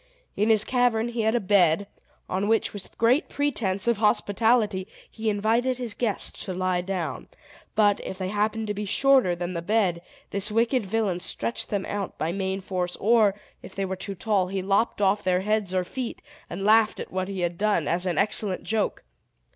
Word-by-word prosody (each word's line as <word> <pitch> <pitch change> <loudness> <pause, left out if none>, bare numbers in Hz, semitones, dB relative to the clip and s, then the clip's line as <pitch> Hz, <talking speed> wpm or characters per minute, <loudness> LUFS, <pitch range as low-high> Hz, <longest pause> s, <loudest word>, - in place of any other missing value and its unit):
In 210 +2 +1
his 215 -2 +4
cavern 240 -2 +1
he 235 -1 -2
had 220 +2 +2
a - - +3
bed, 190 -2 +3 0.4
on 190 +2 -1
which, 225 0 +1
with 205 -2 -10
great 245 +8 +3
pretense 225 -9 0
of 235 -2 +3
hospitality, 210 -1 +2 0.2
he 220 -1 -3
invited 225 +5 +1
his 240 -4 -2
guests 225 -3 -2
to 185 - -4
lie 185 -1 0
down; 180 -2 -4 0.5
but, 205 -2 +4
if 190 - -6
they 185 -1 -3
happened 215 +2 0
to 210 - -2
be 210 +1 -4
shorter 260 -4 +3
than 175 +1 -4
the 170 - -3
bed, 185 -3 +1 0.3
this 200 +2 -2
wicked 230 0 +1
villain 200 -4 0
stretched 230 +5 -3
them 200 -3 -1
out 205 -2 -4
by 160 +2 -1
main 190 +1 -2
force; 180 -2 -3
or, 215 -2 +3 0.3
if - - -12
they 195 - -1
were 190 0 -3
too 195 +1 -6
tall, 195 -1 +1
he 190 0 -3
lopped 200 +2 +1
off 200 +2 +2
their 185 0 +2
heads 210 -1 0
or 185 -1 +1
feet, 245 +6 -5 0.3
and 180 +3 -5
laughed 220 +1 +4
at - - -6
what 185 0 -2
he 195 -2 -4
had 175 0 -1
done, 205 -7 +1
as 175 +3 0
an 175 - -1
excellent 200 -1 +1
joke. 220 -1 -1
205 Hz, 195 wpm, -25 LUFS, 185-220 Hz, 0.5 s, his